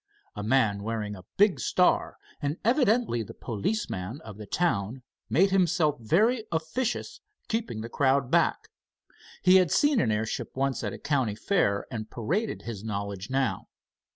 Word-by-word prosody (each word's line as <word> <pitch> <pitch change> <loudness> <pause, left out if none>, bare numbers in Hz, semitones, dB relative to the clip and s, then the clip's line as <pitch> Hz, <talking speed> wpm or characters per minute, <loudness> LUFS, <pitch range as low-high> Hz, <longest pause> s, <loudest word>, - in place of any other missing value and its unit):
A 105 - -4
man 110 -3 +2
wearing 105 -1 -3
a 95 -2 -13
big 205 -2 +4
star, 180 - +2 0.2
and 145 +2 -1
evidently 235 - +2
the 110 - -8
policeman 115 - -3
of 105 -8 -10
the 105 - -8
town, 125 - -1 0.3
made 190 +6 +3
himself 175 -5 +2
very 215 - +2
officious 170 +10 -2 0.3
keeping 225 - -2
the 115 - -5
crowd 135 +1 +1
back. - - +2 0.7
He 185 +1 +7
had 180 -3 +3
seen 290 - +3
an 110 - +1
airship 110 +1 -3
once 135 -3 0
at 105 - -2
a - - -7
county 135 -8 0
fair 105 - +1
and 110 -3 -5
paraded 175 - -2
his 110 -4 -6
knowledge 100 -2 -4
now. 130 -7 -1
135 Hz, 155 wpm, -27 LUFS, -, 0.7 s, He